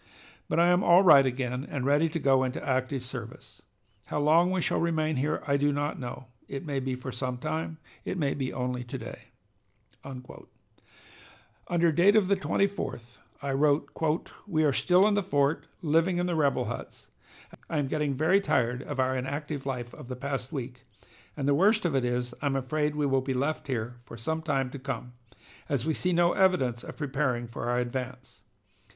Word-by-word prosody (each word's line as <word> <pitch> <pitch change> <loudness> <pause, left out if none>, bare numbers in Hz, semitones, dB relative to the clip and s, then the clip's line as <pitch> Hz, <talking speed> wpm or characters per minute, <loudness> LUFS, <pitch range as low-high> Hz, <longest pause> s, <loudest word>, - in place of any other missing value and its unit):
But - - +1
I 170 +1 +5
am 180 +2 +3
'all 175 +3 +6
right' 140 -7 +8
again 125 0 -2
and 140 -3 -4
ready 145 +4 +3
to 165 - -3
go 135 -3 +3
into 130 +2 -3
active 130 0 0
service. 125 - -9 0.4
How - - -3
long 160 +4 +4
we 185 0 0
shall - - 0
remain 155 -3 0
here 145 +4 -1
I 140 -1 +2
do 145 +1 +2
not 145 +1 -2
know. 125 0 -6 0.2
It 135 +3 -6
may 140 -3 -1
be 130 -1 -2
for 130 +1 -6
some 125 0 -3
time, 160 +5 -3 0.3
it - - -3
may 145 -5 +1
be 130 -2 -3
only 125 -1 -3
to 120 - -6
day." - - -9 0.8
Under 150 +5 -6
date 180 +7 +5
of 200 -4 +4
the 200 - +5
24th 195 - -2 0.2
I 140 - -1
wrote: 145 +2 +2 0.5
"We 155 -5 +1
are 145 -2 +3
still 180 +8 +4
in 215 - +2
the 205 - +2
fort, 145 -3 +1 0.2
living 165 +3 +2
in 175 - +1
the 180 - -1
rebel 145 -4 +2
huts. - - -7 0.6
I 160 - -1
am 145 - +1
getting 150 -1 -1
very 160 +8 +3
tired 125 -8 +1
of 140 -1 -6
our 130 0 +2
inactive 140 +2 -4
life 120 -3 -4
of - - -10
the 125 - -5
past 135 -1 -3
week, 125 -3 -6 0.5
and 140 -2 -1
the 145 - +4
worst 205 +7 +4
of 170 - +1
it 135 -2 +2
is 125 0 -1
I'm 140 -2 0
afraid 150 +3 -1
we 150 -1 0
will 135 -1 +2
be 130 0 -2
left 140 +5 -1
here 120 -2 -3
for 120 -1 -12
some 160 +8 -2
time 135 -5 -1
to 140 - -7
come, 130 -2 -5 0.6
as 140 -3 0
we 160 - +1
see 180 +4 -1
no 175 0 +3
evidence 135 -11 +2
of - - -9
preparing 135 -4 -1
for 120 +1 -5
our 120 - +1
advance. 125 +1 -4
140 Hz, 195 wpm, -28 LUFS, 130-160 Hz, 0.8 s, right